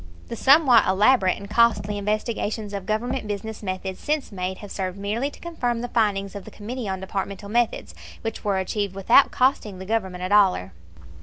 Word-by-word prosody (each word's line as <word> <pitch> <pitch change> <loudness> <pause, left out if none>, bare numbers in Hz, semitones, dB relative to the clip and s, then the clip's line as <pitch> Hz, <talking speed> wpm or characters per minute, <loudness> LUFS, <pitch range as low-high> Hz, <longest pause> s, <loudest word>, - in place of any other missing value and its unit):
The - - -4
somewhat 270 -1 +5
elaborate 195 0 +4
and 200 - -9
costly 210 -2 +2
investigations 210 0 -2
of 195 -2 -5
Government 240 +2 -2
business 210 +1 -5
methods 185 -1 -4
since 300 -4 -2
made 185 -1 -4
have 205 - -10
served 185 -1 -3
merely 215 +7 -2
to - - -15
confirm 245 -9 -2
the 245 - -4
findings 200 -4 0
of 200 -2 -7
the - - -10
Committee 225 +1 -6
on 190 0 -3
Departmental 200 +1 -5
Methods, 235 +1 0 0.3
which 225 -1 -4
were 200 -2 +1
achieved 190 +1 -2
without 230 +8 +5
costing 250 -7 +1
the 190 - -8
Government 190 -4 -2
a 185 - -2
dollar. 190 - +3
210 Hz, 180 wpm, -24 LUFS, 195-235 Hz, 0.3 s, somewhat